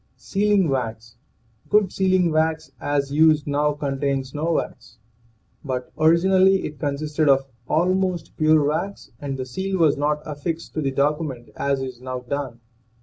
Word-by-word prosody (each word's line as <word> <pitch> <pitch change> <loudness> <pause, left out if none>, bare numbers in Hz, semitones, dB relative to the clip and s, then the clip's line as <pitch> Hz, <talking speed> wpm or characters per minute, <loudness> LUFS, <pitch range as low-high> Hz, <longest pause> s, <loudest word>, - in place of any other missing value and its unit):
SEALING 205 -2 +1
WAX. 115 -5 -3 0.5
Good 210 -3 +3
sealing 185 -3 +2
wax, 155 -3 0
as 140 -1 -1
used 155 -1 +4
now, 145 +1 +1
con 140 -2 -3
tains 135 -2 -1
no 160 +3 -1
wax. - - -4 0.7
But 130 -3 -4
originally 185 +4 +4
it 150 -1 -7
consisted 150 +1 0
of 135 0 +4 0.2
almost 180 +1 0
pure 155 -1 +4
wax, 190 +7 -3
and 140 -2 -4
the 130 - -4
seal 190 +9 -3
was 155 -5 +3
not 150 +1 0
affixed 155 +3 -5
to 155 - -2
the 140 - 0
document 140 -2 -1
as 140 -1 -1
is 130 -2 -7
now 130 -1 -5
done. 125 -2 -5
150 Hz, 150 wpm, -23 LUFS, 135-165 Hz, 0.7 s, used